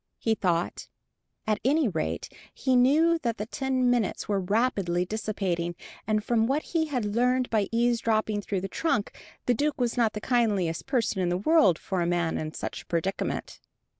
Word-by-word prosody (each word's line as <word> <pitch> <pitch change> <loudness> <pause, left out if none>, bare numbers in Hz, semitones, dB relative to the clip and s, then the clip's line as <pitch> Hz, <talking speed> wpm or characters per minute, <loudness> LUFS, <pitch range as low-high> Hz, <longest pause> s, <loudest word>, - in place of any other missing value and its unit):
he 225 - +1
thought. 175 -5 -1 0.6
At 215 -1 0
any 290 +2 +3
rate 160 -6 -2 0.2
he 260 -2 0
knew 310 +7 +4
that 235 -6 -2
the 210 - -3
ten 260 +1 0
minutes 235 -5 0
were 205 -2 +1
rapidly 190 -3 0
dissipating, 185 -5 -2 0.3
and 215 -1 +1
from 225 0 +2
what 280 +4 0
he 320 -2 -1
had 255 -7 -2
learned 250 +2 +1
by 210 -3 +1
eavesdropping 230 -3 +1
through 195 -2 -2
the 195 - -3
trunk, 215 - -1 0.3
the 245 - +3
Duke 290 +4 -1
was 245 0 0
not 230 -3 +2
the 210 - -4
kindliest 205 -9 0
person 230 -7 0
in 180 - +1
the 175 - 0
world 205 - +4
for 185 -2 -3
a 170 - 0
man 175 -2 0
in 155 0 -4
such - - -5
a - - -20
predicament. 175 +3 -2
220 Hz, 180 wpm, -27 LUFS, 190-250 Hz, 0.6 s, knew